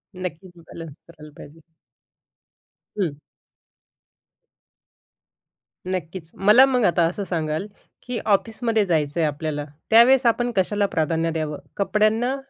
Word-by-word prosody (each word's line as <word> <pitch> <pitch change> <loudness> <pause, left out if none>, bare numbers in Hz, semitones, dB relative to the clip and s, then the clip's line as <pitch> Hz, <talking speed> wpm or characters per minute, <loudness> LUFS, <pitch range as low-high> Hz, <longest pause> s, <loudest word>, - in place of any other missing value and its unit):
नक्कीच. 180 0 -7 0.2
बॅलन्स 165 -3 -10
करायला 155 -2 -14
पाहिजे. 155 +3 -13 1.4
हं. 165 -8 -2 2.7
नक्कीच. 175 -2 -5
मला 210 +7 +6
मग 255 -3 0
आता 175 -1 +2
असं 185 +4 -4
सांगाल 160 0 -3 0.4
की 245 -2 -4
ऑफिसमध्ये 220 +1 +1
जायचंय 160 -2 0
आपल्याला, 150 0 -3 0.2
त्यावेळेस 245 +4 +6
आपण 240 +1 +1
कशाला 205 +2 +1
प्राधान्य 165 0 -1
द्यावं 155 -2 -4 0.2
कपड्यांना 215 +5 +1
185 Hz, 100 wpm, -22 LUFS, 160-220 Hz, 2.7 s, मला